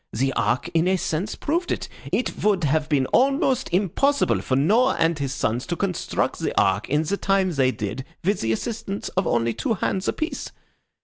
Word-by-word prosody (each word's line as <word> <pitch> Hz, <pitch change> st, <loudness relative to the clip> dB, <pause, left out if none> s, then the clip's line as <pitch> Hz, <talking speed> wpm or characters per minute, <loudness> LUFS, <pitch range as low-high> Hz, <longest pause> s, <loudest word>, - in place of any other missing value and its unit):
The 135 Hz, +3 st, 0 dB
Ark 120 Hz, +8 st, 0 dB
in 165 Hz, +1 st, +2 dB
a 190 Hz, 0 st, +3 dB
sense 175 Hz, +4 st, -2 dB
proved 340 Hz, +4 st, -1 dB
it. -, -, -2 dB, 0.2 s
It 250 Hz, -, -1 dB
would 200 Hz, -4 st, +2 dB
have 150 Hz, +1 st, +1 dB
been 140 Hz, -4 st, +2 dB
almost 265 Hz, -1 st, +2 dB
impossible 210 Hz, -, +2 dB
for 130 Hz, -, -1 dB
Noah 215 Hz, -, +3 dB
and 165 Hz, -1 st, +1 dB
his 140 Hz, -2 st, -2 dB
sons 120 Hz, 0 st, -1 dB
to 175 Hz, -, -1 dB
construct 180 Hz, -1 st, -1 dB
the -, -, 0 dB
Ark 100 Hz, +2 st, +1 dB
in 150 Hz, +3 st, +2 dB
the 200 Hz, +6 st, -1 dB
time 195 Hz, -2 st, +1 dB
they 135 Hz, -5 st, +2 dB
did 110 Hz, +1 st, -4 dB, 0.2 s
with 200 Hz, +4 st, +1 dB
the 110 Hz, -, 0 dB
assistance 210 Hz, -, -3 dB
of 190 Hz, -2 st, -1 dB
only 115 Hz, -1 st, +1 dB
two 115 Hz, -, -1 dB
hands 190 Hz, 0 st, -1 dB
apiece. 315 Hz, +2 st, -3 dB
170 Hz, 190 wpm, -23 LUFS, 135-210 Hz, 0.2 s, a